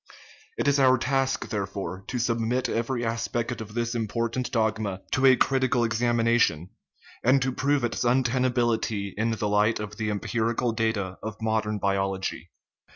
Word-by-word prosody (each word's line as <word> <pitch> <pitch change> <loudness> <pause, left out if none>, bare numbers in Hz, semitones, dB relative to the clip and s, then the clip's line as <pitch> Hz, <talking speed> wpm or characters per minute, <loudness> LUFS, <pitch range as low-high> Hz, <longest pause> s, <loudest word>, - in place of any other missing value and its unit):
It - - -1
is 145 0 +3
our 130 -1 +5
task, 135 +1 0
there 100 -2 -2
fore, 95 -1 -6
to 125 - -3
submit 120 +1 0
every 120 +1 -1
aspect 115 0 -2
of 105 0 -9
this 120 0 -1
important 115 +2 -2
dogma 110 -5 -1
to 135 +1 +4
a 130 - +7
critical 130 -2 +2
examination, 115 -6 +1 0.5
and 130 +3 +5
to 130 - 0
prove 140 +1 0
its 120 - -1
untenability 120 -5 +1
in 110 +2 0
the 110 -1 -1
light 105 +2 +2
of 105 0 -6
the 110 -1 -2
empirical 115 +3 -1
data 110 -5 -2
of 110 -1 -6
modern 110 -1 0
biology. 95 -1 -2
115 Hz, 155 wpm, -26 LUFS, 105-125 Hz, 0.5 s, a